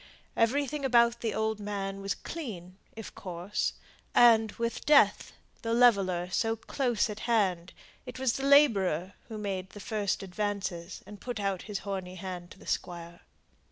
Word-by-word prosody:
Everything 280 +5 +1
about 235 -2 +4
the 225 - -1
old 220 0 -1
man 195 -1 -4
was 195 0 -2
clean, 190 - -7 0.2
if 225 -1 -8
coarse; 180 +2 -3 0.4
and, 225 -3 +6
with 230 -1 -3
Death, 295 -1 +4 0.3
the 230 -1 0
leveller, 195 -8 +4
so 225 +3 +1
close 240 0 0
at 210 -1 -6
hand, 185 -6 +1 0.4
it - - -7
was 260 -2 +1
the 270 - -4
labourer 200 - +4
who 220 -2 -7
made 190 -3 -4
the 205 - -11
first 205 -2 -2
advances, 195 -2 -4
and 205 0 -12
put 245 -3 -4
out 195 -2 -1
his 205 - -2
horny 190 -2 -4
hand 180 -1 -6
to - - -14
the - - -16
Squire. 170 -1 -4
205 Hz, 155 wpm, -29 LUFS, 185-235 Hz, 0.4 s, and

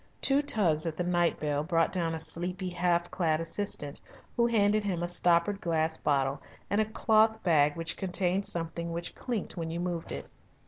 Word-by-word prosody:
Two 275 +1 +3
tugs 175 - +2
at 155 -1 -4
the 180 - 0
night 175 -1 +1
bell 145 -1 -1
brought 165 +1 +1
down 165 -3 -1
a - - -5
sleepy, 180 +3 -2
half 175 -1 0
clad 165 -4 +1
assistant, 165 -4 -4 0.3
who 235 -1 +3
handed 215 -2 +2
him 180 -4 -2
a - - 0
stoppered 175 +3 +2
glass 160 -1 0
bottle 135 -1 0 0.3
and 205 +2 +3
a - - +1
cloth 220 0 +3
bag 150 -4 +3
which 165 0 -2
contained 190 +1 0
something 170 0 -3
which 170 0 -4
clinked 235 -8 -4
when 165 -1 -3
you 165 +1 -4
moved 175 -2 -3
it. - - -5
175 Hz, 185 wpm, -29 LUFS, 165-195 Hz, 0.3 s, Two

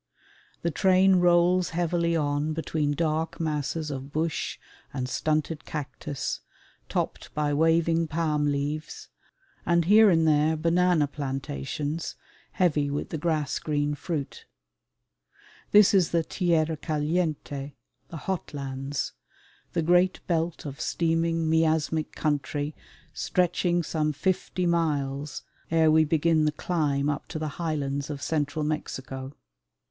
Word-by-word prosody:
The 170 - +1
train 190 +3 +4
rolls 175 0 +4
heavily 170 -1 +1
on 145 0 0
between 155 -2 -1
dark 160 +1 -1
masses 155 0 -2
of 135 0 -6
bush 155 +1 -2 0.3
and 130 -2 -3
stunted 155 +3 -1
cactus, 145 -2 -4 0.5
topped - - -3
by 150 -1 +1
waving 165 +2 +3
palm 155 -2 0
leaves, 145 +2 -3 0.5
and 170 -1 +2
here 210 +3 +7
and 165 -3 +3
there 155 +1 +3
banana 170 0 +3
plantations, 140 - -4 0.4
heavy 150 -6 +2
with 145 +1 -3
the 160 - -4
grass 155 -3 0
green 145 -1 0
fruit. 145 -2 -5 1.2
This 210 -1 +6
is 185 -4 +4
the 170 -1 +1
tierra 160 -2 +1
caliente, 150 -2 -2 0.4
"the 165 - -7
hot 180 -2 -4
lands," 135 0 -3 0.6
the 170 - +1
great 180 +3 +3
belt 165 -2 -1
of 140 +1 -6
steaming 165 -1 0
miasmic 160 -1 +1
country 145 0 -1 0.4
stretching 175 -1 +1
some 155 -1 -1
fifty 185 +2 -1
miles 145 -4 -1 0.3
ere 160 -1 +4
we 155 0 +5
begin 160 0 +2
the 150 - +2
climb 150 -3 0
up 145 -1 -2
to 160 - -5
the 155 -1 -2
highlands 145 -4 -2
of 145 -2 -4
Central 150 -1 -1
Mexico. 135 -3 -4
155 Hz, 120 wpm, -27 LUFS, 145-170 Hz, 1.2 s, here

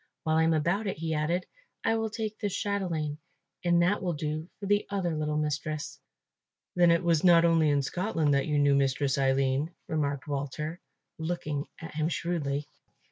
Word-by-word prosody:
While 160 0 +2
I 160 - +4
am 165 - +3
about 175 +8 0
it," 190 - -2
he 160 0 -2
added, 160 +4 0 0.4
"I 225 - +3
will 225 0 -1
take 215 -1 -4
this 205 -2 -2
chatelaine, 170 -7 -2 0.4
and 175 -1 +4
that 195 +4 +2
will 180 -2 -1
do 155 +2 -3
for 200 - -6
the 205 +1 +2
other 185 -5 -1
little 150 0 -1
mistress." 150 0 -2 0.8
"Then 175 -1 +5
it 170 +1 +3
was 165 -3 +2
not 170 -2 +7
only 165 -2 +4
in 145 -1 +2
Scotland 165 -2 0
that 140 -1 +1
you 150 -1 +1
knew 145 -1 +4
Mistress 140 0 +1
Aline," 135 +2 +2 0.2
remarked 145 -2 -1
Walter, 150 +4 -3 0.4
looking 160 -3 -3
at 165 - -8
him 155 +1 0
shrewdly. 150 -5 -2
160 Hz, 180 wpm, -29 LUFS, 145-175 Hz, 0.8 s, not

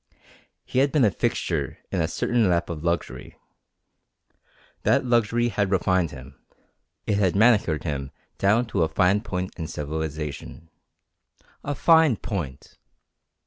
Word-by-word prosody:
He 130 - -1
had 140 +1 +3
been 145 -6 +3
a 105 - +3
fixture - - -2
in 95 - 0
a 80 - +1
certain 115 +3 +1
lap 85 -1 0
of 80 -2 -6
luxury. 85 0 -3 1.5
That - - +2
luxury 120 0 +2
had 100 -2 -1
refined 95 -2 +1
him. 70 -1 -13 0.6
It 105 -1 0
had 95 -3 +2
manicured 100 - +3
him 70 -4 -3 0.3
down 105 +5 +3
to 95 - +1
a 80 - +3
fine 90 +5 +2
point 95 -3 -5
of 80 -1 -4
civilization. 80 +1 -5 0.9
A 145 - -3
fine 160 -5 +5
point! 80 - -6
95 Hz, 135 wpm, -24 LUFS, 80-115 Hz, 1.5 s, fine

